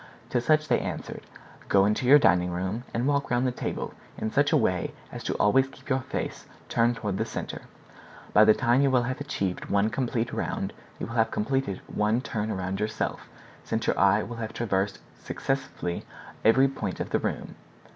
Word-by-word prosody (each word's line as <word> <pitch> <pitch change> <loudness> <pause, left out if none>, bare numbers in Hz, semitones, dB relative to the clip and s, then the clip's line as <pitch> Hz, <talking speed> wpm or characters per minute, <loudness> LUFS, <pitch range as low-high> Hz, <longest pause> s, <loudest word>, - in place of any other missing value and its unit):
To 120 - +2
such 155 +3 +3
they 125 - +3
answered, - - -5 0.5
"Go 100 -1 +5
into 105 +4 +1
your 145 +3 +9
dining 90 -8 +4
room, 95 +7 -3
and 120 +2 -1
walk 140 -1 +1
round 120 +1 +2
the 130 - +2
table 125 - -4 0.2
in 110 - -2
such 145 +1 +3
a - - +5
way 90 -1 0 0.2
as - - -7
to - - -1
always 130 +6 +4
keep 135 - -15
your 130 0 +2
face 130 - -5 0.2
turned 120 +1 +3
toward 105 -4 -3
the - - +2
center; - - -5 0.7
by 105 - +8
the 110 - +6
time 125 +1 +3
you 140 - +4
will 125 -2 +3
have 130 +3 -3
achieved 95 -10 -2
one 100 +2 +2
complete 120 -1 -1
round - - -2 0.2
you - - -4
will 115 - -7
have 115 -2 +3
completed 110 -3 -1
one 105 +3 +1
turn 110 -4 -3
around 95 -1 -2
yourself, 110 0 -2 0.3
since - - -2
your - - +1
eye - - +5
will 120 - -7
have 110 -1 -4
traversed 100 -3 0 0.2
successively 130 -10 -3 0.4
every 130 +5 +6
point 110 -9 -4
of - - -4
the - - +2
room. - - -3
115 Hz, 195 wpm, -27 LUFS, 100-130 Hz, 0.7 s, your